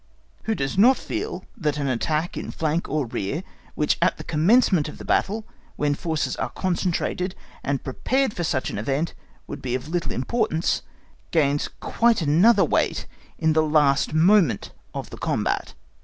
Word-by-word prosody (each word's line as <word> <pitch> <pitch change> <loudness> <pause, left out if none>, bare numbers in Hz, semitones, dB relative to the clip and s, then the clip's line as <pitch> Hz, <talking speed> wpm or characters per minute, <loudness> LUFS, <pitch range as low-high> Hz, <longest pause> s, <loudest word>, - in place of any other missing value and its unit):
Who 220 - 0
does 135 +4 -2
not 255 +5 +7
feel 390 +7 -4
that 150 - -1
an 140 -1 -1
attack 150 +6 -1
in - - -5
flank 160 +2 -1
or 150 -3 0
rear, 120 - -3 0.3
which 150 - +1
at 180 - +3
the - - -7
commencement 170 - +3
of - - -10
the - - -9
battle, 215 +2 0 0.3
when 145 -1 +1
the 145 - -1
forces 160 -3 -1
are - - -2
concentrated 180 0 -1 0.3
and 140 -1 -1
prepared 260 - 0
for 175 - -3
such 135 -5 -1
an - - -4
event 140 +9 -1 0.3
would - - -7
be 125 -1 -2
of 130 +4 -5
little 175 0 -1
importance, 160 - 0 0.5
gains 145 -3 +2
quite 235 -1 +2
another 170 +11 +5
weight - - 0 0.3
in 160 -1 +2
the 155 - +4
last 150 -3 +3
moment 160 - +3 0.2
of - - -6
the - - -8
combat. - - -1
160 Hz, 170 wpm, -24 LUFS, 145-190 Hz, 0.5 s, not